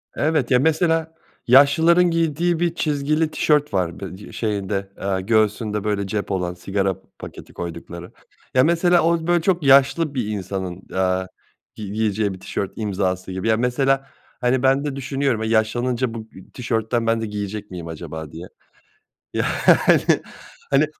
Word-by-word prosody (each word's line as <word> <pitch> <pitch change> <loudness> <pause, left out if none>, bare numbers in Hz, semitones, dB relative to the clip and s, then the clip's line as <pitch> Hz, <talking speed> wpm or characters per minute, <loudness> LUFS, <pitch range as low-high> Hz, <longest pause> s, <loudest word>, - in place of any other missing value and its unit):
Evet 150 -5 0
ya, 125 - +5
mesela, 160 +2 +1 0.3
yaşlıların 145 +7 +6
giydiği 165 +1 +1
bir 170 -1 0
çizgili 155 +1 0
tişört 150 -5 +1
var. 90 -3 -1
Bı 95 -1 -7
d 105 - -12
şeyinde, 100 -3 -2
eee, 95 -1 -1
göğsünde 105 0 +1
böyle, 105 -2 -1
cep 100 +1 -3
olan, 90 -2 -1
sigara 95 +1 -1 0.2
paketi - - -10
koydukları 85 +1 -7 0.4
ya, 130 - +5
mesela 170 +2 +3
o 165 0 +1
böyle 175 -1 +3
çok 175 -1 +1
yaşlı 140 +3 +4
bir 120 -5 -1
insanın, 95 -3 -4
eee, 95 0 0 0.5
gi 105 -2 -7
giyeceği 105 -1 0
bir 95 - -10
tişört 95 +1 -4
imzası 95 -3 -2
gibi. 95 +3 -3
Ya, 110 -1 +3
mesela, 135 +3 +1 0.4
hani, 125 +1 +1
ben 135 +2 +3
de 145 -2 -3
düşünüyorum, 135 -4 -1
e, - - -1
yaşlanınca 115 +2 0
bu 115 - -5
ı 110 -4 -14
tişörtten 115 -1 -1
ben 115 0 +1
de - - -2
giyecek 105 0 -5
miyim 85 -2 -7
acaba 80 -1 -7
diye. 85 +3 -9 0.9
Yani, - - 0 1.2
hani 140 +2 +4
115 Hz, 155 wpm, -21 LUFS, 95-140 Hz, 1.2 s, yaşlıların